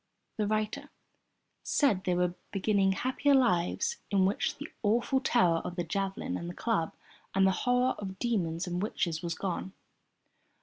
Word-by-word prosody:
The 210 -2 0
writer 215 +7 -1 0.7
said 225 -11 +2
they 180 - +2
were 180 0 +1 0.2
beginning 195 -1 +2
happier 260 +6 +2
lives 240 - +2
in 195 -2 +3
which 195 +3 0
the 295 - -6
awful 235 +5 +2
terror 180 -10 +3
of 180 - -5
the 175 - -1
javelin 195 +9 -2
and 170 - -5
the 175 - -7
club, 210 -9 -1 0.4
and 195 0 +5
the 190 - +5
horror 250 +5 +2
of 190 -2 -6
demons 180 -8 -1
and 180 0 -2
witches 170 -6 -1
was 170 -2 -3
gone. 190 0 -3
195 Hz, 160 wpm, -30 LUFS, 180-240 Hz, 0.7 s, and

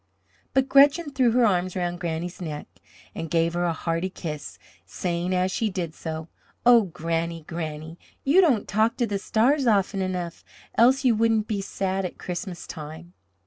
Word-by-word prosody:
but 265 0 +3
Gretchen 285 +3 +5
threw 260 -3 +3
her 245 -1 +4
arm 185 -3 +2
around 175 -1 -2
Granny's 170 +2 -4
neck 150 -4 -5 0.5
and 165 -1 -5
gave 165 +1 +1
her 175 0 0
a 170 - +1
hearty 165 +2 -2
kiss, 150 - -6 0.3
saying 175 - -3
as 185 0 +1
she 220 +3 0
did 175 -5 -4
so: 160 -1 -6 0.4
"Oh, 235 -3 +7
Granny, 165 -1 -3
Granny, 160 0 -6 0.2
you 310 +8 +5
don't 265 - +2
talk 220 +3 +1
to 240 - +2
the 205 -3 -2
stars 255 +7 +2
often 200 -3 +2
enough, 180 -2 -3 0.3
else 265 +4 +4
you 245 - +5
wouldn't 225 -1 +2
be 205 -2 -1
sad 195 0 -2
at 180 - -5
Christmas 180 0 -5
time." 160 +2 -9
185 Hz, 170 wpm, -25 LUFS, 165-225 Hz, 0.5 s, Oh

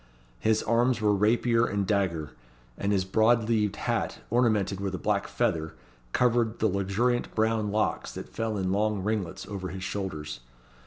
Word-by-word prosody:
His 110 0 +2
arms 120 +2 +2
were 105 -1 +3
rapier 115 +3 +3
and 100 -1 -1
dagger; 90 -8 0 0.4
and 100 +8 -1
his 95 -2 +1
broad 110 +3 +3
leaved 105 -3 +1
hat, - - -1
ornamented 110 -5 +2
with 100 -1 -2
a - - -3
black 100 +1 0
feather, 85 -10 -1 0.4
covered 120 - +2
the 110 - +2
luxuriant 100 +5 0
brown 110 -1 +1
locks 110 +1 -1
that - - -7
fell 110 -2 -2
in 95 -1 -1
long 105 0 0
ringlets 105 -4 -2
over 95 -2 -5
his 95 +1 -6
shoulders. 90 -10 -4
105 Hz, 160 wpm, -28 LUFS, 95-115 Hz, 0.4 s, were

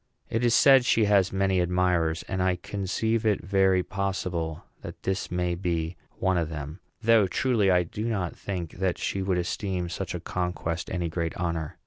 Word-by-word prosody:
It 115 +2 0
is 120 -1 +4
said 135 -1 +7
she 115 -2 +3
has 100 -2 +3
many 95 -1 +1
admirers, 90 -2 +1
and 95 - -3
I 90 0 +2
conceive 100 +5 -2
it 105 -5 +1
very 95 -1 +3
possible 90 -5 -3 0.2
that - - -9
this 95 0 -2
may 90 0 -1
be 85 -2 -2 0.2
one 95 -1 +1
of 80 -2 -2
them; 75 +2 -6 0.2
though, 115 -3 +5
truly, 105 +1 +2
I 90 -1 +4
do 105 +6 -5
not 100 -7 -2
think 90 -4 -5
that 95 -2 0
she 95 - -2
would 95 -1 0
esteem 90 0 -2
such 95 +2 -4
a - - -3
conquest 90 -1 -3
any 90 -2 -2
great 85 0 -3
honor. 85 -3 -3
90 Hz, 180 wpm, -27 LUFS, 85-100 Hz, 0.2 s, said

